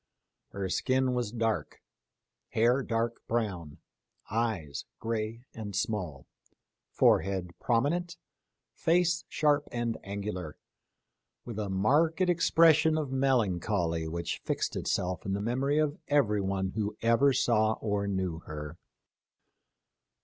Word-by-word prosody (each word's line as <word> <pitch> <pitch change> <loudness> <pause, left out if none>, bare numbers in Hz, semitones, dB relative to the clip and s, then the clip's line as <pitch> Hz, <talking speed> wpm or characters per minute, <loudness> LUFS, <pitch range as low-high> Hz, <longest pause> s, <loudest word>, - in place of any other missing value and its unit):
Her 100 -1 -4
skin 130 +6 +1
was 120 -4 -1
dark; 110 - -2 0.7
hair 120 +4 +3
dark 115 -1 -1
brown; 95 -10 -2 0.5
eyes 105 -10 -2
gray 115 +1 -3
and 105 -3 -6
small; 90 -10 -2 0.6
forehead 95 -2 +2
prominent; 150 +9 0 0.6
face 170 0 +2
sharp 150 -1 +2
and 120 -1 -2
angular, 100 -5 -5 0.9
with 115 -3 -5
a 105 -2 -2
marked 145 - +2
expression 165 -3 +4
of 150 -4 -2
melancholy 100 -10 +1
which 85 +1 -3
fixed - - -2
itself 90 -1 -1
in 95 - -2
the 100 - -1
memory 130 +7 0
of 155 -1 +1
everyone 100 -9 +1
who 105 0 -3
ever 115 +5 +4
saw 110 -4 +3
or 100 -2 -2
knew 95 -4 -2
her. 75 0 -8
110 Hz, 110 wpm, -30 LUFS, 95-130 Hz, 0.9 s, expression